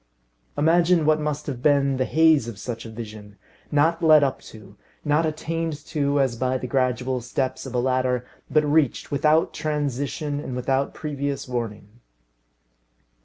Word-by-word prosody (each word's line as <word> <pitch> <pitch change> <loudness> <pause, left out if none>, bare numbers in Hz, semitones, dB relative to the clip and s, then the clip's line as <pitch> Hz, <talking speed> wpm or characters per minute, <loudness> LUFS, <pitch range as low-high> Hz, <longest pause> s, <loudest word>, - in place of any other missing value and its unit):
Imagine 165 +2 +3
what 155 0 +3
must 150 0 -3
have 130 -4 -5
been 140 -1 +3
the 130 - +1
haze 160 -5 +4
of 115 -4 -7
such 115 +1 -6
a - - -9
vision, 110 -2 -9 0.3
not 160 +4 +2
led 155 -3 +6
up 135 -2 -1
to, 105 -2 -14 0.3
not 150 +2 +2
attained 165 +1 -3
to 145 -2 0
as 130 -3 +1
by 130 +2 0
the 130 - -6
gradual 125 0 0
steps 130 +2 -3
of 130 - -7
a - - +2
ladder, 130 -1 0 0.2
but 155 -1 +3
reached 150 -3 +1
without 150 +3 +2
transition 145 -1 -2
and 130 -3 -5
without 135 +2 -1
previous 140 -3 -3
warning. 115 -3 -5
140 Hz, 155 wpm, -24 LUFS, 125-150 Hz, 0.3 s, led